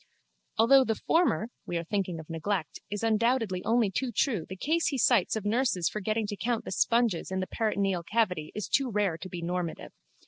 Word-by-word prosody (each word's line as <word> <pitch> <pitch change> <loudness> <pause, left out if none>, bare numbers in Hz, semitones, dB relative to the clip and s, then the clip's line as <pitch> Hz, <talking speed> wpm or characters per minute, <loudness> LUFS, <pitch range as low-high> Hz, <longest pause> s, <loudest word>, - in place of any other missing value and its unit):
Although 265 +5 +6
the 225 - 0
former 325 -6 +1 0.2
(we 175 - -2
are 170 - -2
thinking 185 -2 -2
of 160 - -10
neglect) 165 +1 -3
is 205 +1 -4
undoubtedly 225 -4 +1
only 230 -3 +2
too 255 +5 -2
true 220 - 0
the 190 - -5
case 320 - 0
he 280 - -1
cites 230 -5 +3
of 215 -2 -4
nurses 205 -6 +1
forgetting 215 +1 -1
to 205 0 -4
count 235 +2 -2
the - - -5
sponges 230 -1 +1
in 190 0 -2
the 185 - -1
peritoneal 200 -4 0
cavity 180 -5 -1
is 210 - -3
too 270 -2 +1
rare 200 -6 0
to 185 - -8
be 175 -1 -6
normative. 175 -1 -3
210 Hz, 200 wpm, -29 LUFS, 180-230 Hz, 0.2 s, Although